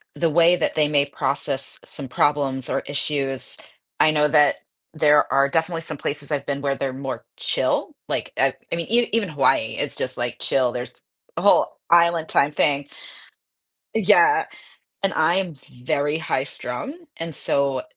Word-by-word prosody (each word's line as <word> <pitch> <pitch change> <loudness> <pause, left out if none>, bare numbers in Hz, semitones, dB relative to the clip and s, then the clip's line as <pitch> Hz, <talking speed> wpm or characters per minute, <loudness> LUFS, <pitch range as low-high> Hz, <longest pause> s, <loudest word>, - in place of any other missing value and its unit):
the 165 - +1
way 170 +2 +5
that 175 - -1
they 150 -1 +3
may 145 -1 +2
process 140 -1 -3
some 135 -2 -8
problems 135 -1 0
or - - 0
issues. 140 -2 -3 0.4
I 155 - +5
know 150 -1 +3
that 150 -1 +4 0.4
there 150 -1 +4
are 140 0 +4
definitely 165 +2 -1
some 155 -2 -6
places 145 +1 -5
I've 140 -1 -1
been 140 0 -3
where 140 -1 0
they're 135 -1 -3
more 135 0 -5
chill, - - -1
like - - -2
uh, - - +3 0.2
I - - +1
mean, 170 0 -3
even 230 -3 +2
Hawaii, 135 -7 +1
it's 145 - -2
just, 130 0 -4
like, 120 -1 -2
chill, 130 -2 +1
there's 125 0 -5 0.4
a - - -1
whole - - +4
island 170 -1 +4
time 140 - +3
thing. 145 -1 +1 1.1
Yeah, 225 - +4 0.6
and 195 -2 +1
I'm 170 +1 +1 0.3
very 145 +4 0
high 160 -4 -1
strung, 210 - -7
and 165 0 -5
so, 140 -2 0
145 Hz, 160 wpm, -22 LUFS, 140-165 Hz, 1.1 s, way